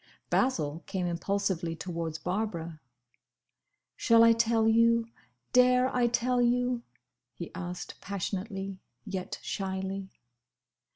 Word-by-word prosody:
Basil 165 - +1
came 190 -2 -2
impulsively 175 -1 -1
towards 165 -2 -4
Barbara. 170 -4 -3 1.1
"Shall 230 -1 +5
I 230 0 +7
tell 230 -1 +2
you? 230 +1 +4 0.5
Dare 250 +1 +5
I 245 -1 +3
tell 245 +1 +1
you?" 245 0 +2 0.5
he 170 - -7
asked 180 0 -6
passionately, 195 0 -4 0.3
yet 190 -3 -4
shyly. 190 0 -3
195 Hz, 100 wpm, -29 LUFS, 180-230 Hz, 1.1 s, I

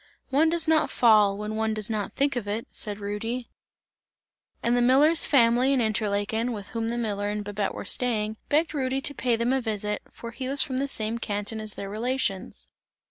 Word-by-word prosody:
"One 305 +4 +4
does 335 0 0
not 315 -1 +3
fall, 210 -4 +4
when 210 +1 -4
one 220 0 0
does 215 -1 0
not 215 -3 -3
think 280 0 +1
of 235 -4 -3
it!" 215 +3 -2
said 210 -1 -3
Rudy. 225 +4 -4 1.1
And 235 +1 +2
the 245 - +2
miller's 285 +7 +5
family 250 0 +4
in 265 - +2
Interlaken, 220 +1 0
with 205 -2 -7
whom 225 0 -2
the 235 - -2
miller 205 -3 -2
and 210 0 -3
Babette 205 0 -3
were - - -6
staying, 220 -3 0
begged 310 +2 +2
Rudy 265 -2 -1
to 285 - -1
pay 250 -4 +1
them 235 +3 0
a 265 - +1
visit, 210 -2 -2
for 235 - -9
he 255 +2 -5
was 275 0 +4
from 260 -3 -3
the 280 - -1
same 225 -3 -1
canton 210 0 -3
as 215 -2 -3
their 200 - -6
relations. 210 - -2
230 Hz, 200 wpm, -26 LUFS, 210-260 Hz, 1.1 s, miller's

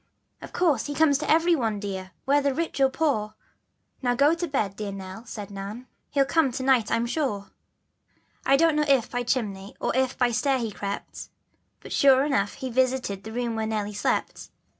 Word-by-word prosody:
" - - -45
"Of - - -9
course 310 -10 +1
he 290 - -4
comes 290 -3 +4
to - - -4
every 330 +2 +4
one, 225 -7 -1
dear, 190 -2 -5 0.2
whether 280 0 +2
rich 330 -2 -2
or 270 - +5
poor; 265 -8 -1 0.7
Now 245 -2 +1
go 285 +5 +4
to 340 +1 -2
bed 215 - -1
dear 210 -1 -4
Nell," 195 +3 -8
said 210 -3 -7
Nan, 200 +5 -7 0.2
"he'll 275 -1 +2
come 300 -2 +2
to 260 - -3
night 260 -4 +3
I'm 230 +1 +1
sure." 240 -7 -2 1.0
1 275 +1 +6
don't 330 0 +3
know 300 0 +2
if 270 -5 +3
by 245 - -1
chimney 205 -6 -2
or - - -1
if 260 0 +1
by 245 -2 +2
stair 265 +3 +1
he 230 -3 -3
crept, 200 0 -6 0.5
But - - -8
sure 270 0 +5
enough 205 -9 0
he 260 -1 -5
visited 250 -6 0
the 220 - -8
room 235 0 -2
where 220 0 -1
Nelly 210 -1 -2
slept. 205 - -2
245 Hz, 200 wpm, -26 LUFS, 210-280 Hz, 1.0 s, 1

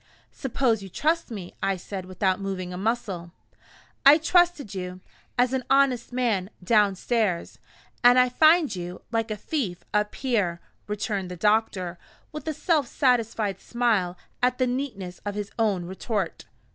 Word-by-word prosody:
"Suppose 245 -4 0
you 195 - -8
trust 320 - 0
me?" 195 -6 -7
I 195 -1 +1
said, 190 +1 -6
without 185 +1 0
moving 185 -2 -4
a - - -5
muscle. 195 -4 -2 0.7
"I 280 +2 +9
trusted 330 - +2
you, 180 -1 -5 0.4
as 250 +1 +3
an 260 -1 0
honest 270 -3 +3
man, 230 -7 0
downstairs, 205 -1 +1 0.4
and 245 +1 +7
I 255 0 +6
find 310 - +4
you, 180 0 -6
like 225 -1 0
a 215 - -3
thief, 205 - -3
up 210 0 +1
here," 205 -10 0 0.3
returned 205 -2 -2
the 180 - -7
doctor, 195 -4 +1 0.3
with 305 0 -8
a 315 - 0
self 305 -6 +1
satisfied 230 -7 +1
smile 215 -7 0 0.2
at 250 0 +2
the 255 - +2
neatness 245 -9 -4
of 205 -1 -4
his 205 -1 -4
own 200 -6 +1
retort. 190 0 -3
215 Hz, 150 wpm, -26 LUFS, 185-250 Hz, 0.7 s, I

